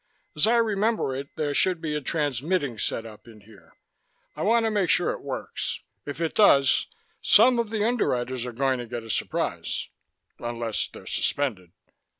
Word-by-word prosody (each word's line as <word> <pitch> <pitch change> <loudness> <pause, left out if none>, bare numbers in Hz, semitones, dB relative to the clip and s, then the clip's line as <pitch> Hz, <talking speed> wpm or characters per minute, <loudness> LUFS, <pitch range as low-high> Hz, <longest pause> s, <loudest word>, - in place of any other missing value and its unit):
"As 150 - +4
I 235 +1 +4
remember 215 - +1
it, 140 +1 -5
there 150 -2 -1
should 180 +3 +2
be 155 -2 -3
a 150 - -1
transmitting 145 -2 -1
setup 115 0 -4
in 110 -2 -14
here. 105 -1 -19 0.6
I - - -6
want 230 +2 +3
to 220 - +1
make 200 -5 +1
sure - - +3
it - - -6
works. - - -4 0.3
If 145 - -5
it 165 -1 -1
does, 140 -10 +5 0.3
some 240 +3 +6
of 230 -2 -1
the 215 -1 0
Underwriters 130 - 0
are - - -4
going 130 +1 0
to 120 - -6
get 120 0 -5
a 115 - -5
surprise, - - -2 0.5
unless 120 -2 -2
they're - - -13
suspended." 105 -12 -1
145 Hz, 170 wpm, -26 LUFS, -, 0.6 s, some